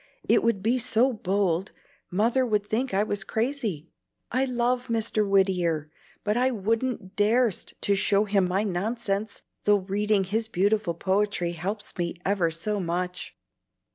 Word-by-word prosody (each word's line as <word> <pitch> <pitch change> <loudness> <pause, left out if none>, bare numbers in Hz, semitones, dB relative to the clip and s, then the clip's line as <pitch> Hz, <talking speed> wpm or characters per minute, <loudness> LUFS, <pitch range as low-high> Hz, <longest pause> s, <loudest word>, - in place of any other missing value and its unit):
It - - +4
would 230 -5 0
be 240 +4 +2
so 245 +3 +2
bold, 195 -3 0 0.4
Mother 230 +8 +2
would 210 -4 0
think 245 +5 -1
I 195 +2 +2
was 205 -2 -2
crazy. 220 - -2 0.4
I 255 +3 +2
love 250 0 0
Mr. 220 -3 0
Whittier, 175 -6 +2 0.3
but 210 0 0
I 250 +2 +3
wouldn't 225 -2 -2
dar'st 220 0 +1
to 200 - +2
show 200 +1 +2
him 195 -3 +2
my 190 +3 0
nonsense, 205 +1 -2 0.2
though 205 0 +5
reading 200 +1 0
his 220 +4 -1
beautiful 205 -3 +1
poetry 190 -1 0
helps 190 +5 -4
me 170 0 -1
ever 190 -4 +2
so 175 +6 -1
much." 180 0 -3
205 Hz, 145 wpm, -26 LUFS, 190-225 Hz, 0.4 s, though